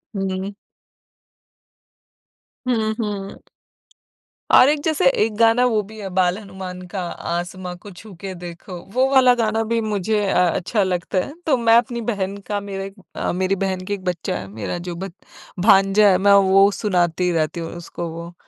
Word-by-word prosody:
हुँ। 195 +1 -3 2.1
हुँ, 220 -3 +1
हुँ। 200 -3 -4 1.1
और 265 - +8
एक 295 -1 +1
जैसे 315 -2 +1
एक 220 -4 0
गाना 230 +2 +4
वो 220 -4 +2
भी 215 +2 -12
है, 195 -2 -5
बाल 180 0 +1
हनुमान 190 -3 -8
का 190 +1 -4 0.3
आसमा 180 +1 -4
को 200 +3 -12
छूके 190 0 -9
देखो, 175 +1 -9
वो 260 +1 +3
वाला 255 -2 +6
गाना 225 -1 0
भी 230 +1 0
मुझे 210 0 0
अ, 190 - +2 0.2
अच्छा 200 +3 0
लगता 180 0 -2
है। 285 - -9
तो 275 -5 +3
मैं 230 -1 +4
अपनी 235 0 0
बहन 195 -1 -3
का 205 -1 -1
मेरा 195 -1 -6
एक 195 0 -7 0.2
अ, - - -1
मेरी 185 +2 0
बहन 190 -1 -2
के 205 - -3
एक 195 - -5
बच्चा 180 -3 -2
है, 95 - -7
मेरा 110 - -5
जो 175 - -4
बच 190 +1 -6 0.5
भांजा 195 +1 +5
है 185 - +4
मैं 200 +1 +4 0.2
वो 195 +1 +6
सुनाती 180 -3 0
रहती 165 +1 -1
हूँ 165 - -5
उसको 170 0 -6
वो। 170 +1 -8
195 Hz, 170 wpm, -21 LUFS, 180-220 Hz, 2.1 s, और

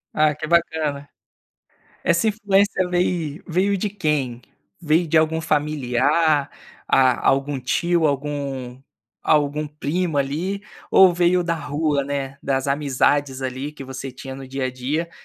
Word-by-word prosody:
Ah, 155 -1 +3
que 155 - -5
bacana. 155 -4 0 1.0
Essa 170 +6 +3
influência 200 -3 +1
vei 175 -2 -1
veio 195 +3 +1
de 205 +1 -2
quem? 150 -10 -1 0.4
Veio 165 +1 +2
de 160 +1 +4
algum 160 +1 +1
familiar, 150 0 +1 0.4
a 130 -2 +3
algum 135 +1 +1
tio, 170 +6 +1
algum 140 -3 -3 0.4
algum 150 0 +1
primo 150 +2 -2
ali, 165 +9 -1 0.3
ou 190 -2 +7
veio 175 +1 +2
da 170 -1 0
rua, 145 -1 -1
né, 140 0 -4
das 135 0 -1
amizades 140 -1 +1
ali 130 +3 -4
que 145 -2 -10
você 130 0 -6
tinha 130 +1 -8
no 135 -1 -9
dia 135 0 -3
a 130 - -1
dia 145 +7 -3
150 Hz, 140 wpm, -22 LUFS, 135-170 Hz, 1.0 s, ou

